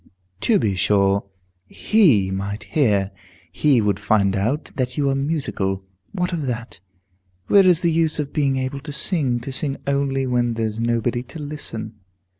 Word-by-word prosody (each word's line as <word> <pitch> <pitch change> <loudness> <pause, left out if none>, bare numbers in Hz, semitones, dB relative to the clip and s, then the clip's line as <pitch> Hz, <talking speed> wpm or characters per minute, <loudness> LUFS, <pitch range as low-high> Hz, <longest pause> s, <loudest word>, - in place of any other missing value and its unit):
"To 220 - +3
be 105 - +1
sure, 100 +1 +2 0.4
he 140 - +3
might 100 +2 -4
hear. 105 -9 +1 0.4
He 140 -6 +3
would 105 -1 0
find 100 -2 +2
out 115 +10 -1
that 125 -1 -2
you 145 -1 +1
are - - 0
musical. 135 -10 -2 0.3
What 180 -2 -2
of 155 -5 -2
that? 120 -4 -5 0.7
Where 195 -2 +6
is 180 -2 +4
the 170 - +2
use 160 -1 +1
of 150 -2 -3
being 140 -3 +1
able 130 +1 -3
to 150 +2 -8
sing, 140 -5 0
to 135 - -6
sing 135 +1 -2
only 140 -1 0
when 120 -2 0
there's 110 -1 -2
nobody 120 +1 0
to 160 - -10
listen?" 115 -8 -6
130 Hz, 165 wpm, -22 LUFS, 110-150 Hz, 0.7 s, Where